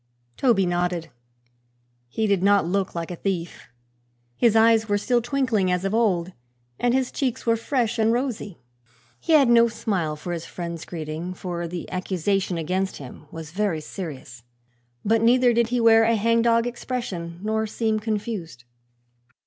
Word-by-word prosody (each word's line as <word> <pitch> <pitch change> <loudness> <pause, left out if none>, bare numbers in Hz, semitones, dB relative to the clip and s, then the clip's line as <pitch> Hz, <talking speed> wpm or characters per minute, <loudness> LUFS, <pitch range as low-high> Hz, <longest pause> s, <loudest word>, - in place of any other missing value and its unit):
Toby 230 -8 +3
nodded. 175 -2 -1 1.0
He 220 - -1
did 200 -3 +2
not 200 -2 +4
look 190 +2 -1
like 170 +1 -4
a - - -4
thief. 175 -2 -4 0.7
His 230 - +3
eyes 225 0 +4
were 205 - +3
still 240 +3 +1
twinkling 240 -6 0
as 180 +1 0
of 195 - -1
old 190 -6 +1 0.5
and 245 0 +2
his 260 -1 0
cheeks 260 -5 -2
were 230 -1 +3
fresh 235 -1 -1
and 220 0 +3
rosy. 235 -6 -2 0.6
He 325 - 0
had 285 -4 +6
no 235 0 +6
smile 190 -9 -2
for 175 +4 -5
his 165 -1 -4
friend's 170 -2 -6
greeting, 165 +2 -5
for 175 -2 -4
the 175 0 -6
accusation 185 0 -1
against 185 +4 -2
him 140 +2 -11
was 160 -1 -9
very 190 -3 -1
serious, 150 -8 -8 0.6
but 225 +2 +3
neither 245 +1 +4
did 235 0 +2
he 245 +1 0
wear 225 -1 +6
a 230 +1 +3
hang 230 +2 +2
dog 230 0 +3
expression 235 -9 -5
nor 220 +1 0
seem 220 0 -1
confused. 210 - -4
205 Hz, 160 wpm, -24 LUFS, 175-230 Hz, 1.0 s, had